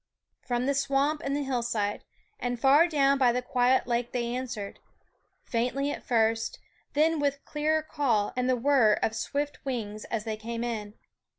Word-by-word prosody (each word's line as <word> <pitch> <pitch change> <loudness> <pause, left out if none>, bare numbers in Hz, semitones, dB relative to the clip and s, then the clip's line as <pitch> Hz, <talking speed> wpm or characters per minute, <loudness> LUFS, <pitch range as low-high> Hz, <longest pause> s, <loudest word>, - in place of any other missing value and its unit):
From 245 0 -1
the 280 - +2
swamp 280 +2 +1
and 275 0 -1
the 290 - -1
hillside 235 -6 -1 0.4
and 245 -1 -2
far 285 +7 +6
down 280 -4 +3
by 250 -2 +5
the 250 +1 -1
quiet 250 +1 +2
lake 240 0 -1
they 240 -1 -1
answered, 245 -5 -5 0.6
faintly 255 +4 -1
at - - -5
first, 225 -1 +1 0.4
then 315 +2 +3
with 280 -1 -1
clearer 310 +1 0
call 245 -10 0
and 250 0 0
the 255 - +4
whirr 245 -4 +4
of 220 - 0
swift 290 +5 -3
wings 215 -6 -4
as 225 -2 -3
they 220 -1 -3
came 230 +2 -4
in. 215 -3 -4
250 Hz, 170 wpm, -28 LUFS, 230-280 Hz, 0.6 s, far